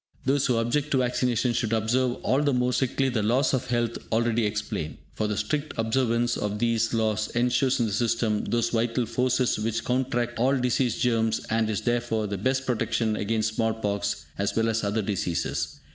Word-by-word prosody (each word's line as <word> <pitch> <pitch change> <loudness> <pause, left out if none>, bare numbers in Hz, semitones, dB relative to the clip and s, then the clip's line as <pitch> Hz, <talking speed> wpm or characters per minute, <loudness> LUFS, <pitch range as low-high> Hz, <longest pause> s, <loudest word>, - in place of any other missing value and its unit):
Those 135 +1 +2
who 125 - +2
object 125 +6 0
to - - +4
vaccination 125 -1 +1
should 115 -1 -1
observe 120 +3 +1
all 135 +2 +2
the 145 -2 +2
more 125 0 +1
strictly 130 +1 +1
the 120 -4 0
laws 125 +6 +2
of 130 - -1
health 120 -1 -1
already 115 0 +2
explained; 105 -7 -4 0.2
for 110 - -1
the 105 -1 -2
strict 150 0 -2
observance 120 +1 +1
of 105 0 -2
these 115 0 +1
laws 110 -2 0
ensures 125 +2 +2
in 120 - +2
the 110 - -2
system 115 -1 0
those 115 0 0
vital 120 +1 0
forces 125 0 +1
which 115 +1 -2
counteract 120 -2 -1
all 135 +3 +3
disease 125 -2 +1
germs, 115 -2 +1
and 110 -1 +1
is, 105 - -1
therefore, 120 -2 0
the 100 -2 -3
best 130 +5 0
protection 115 -3 0
against 110 +1 -1
small 110 -1 0
pox 100 -6 -2
as 100 0 0
well 115 0 +2
as 115 0 0
other 105 +2 0
diseases. 95 -4 -2
115 Hz, 190 wpm, -26 LUFS, 110-125 Hz, 0.2 s, to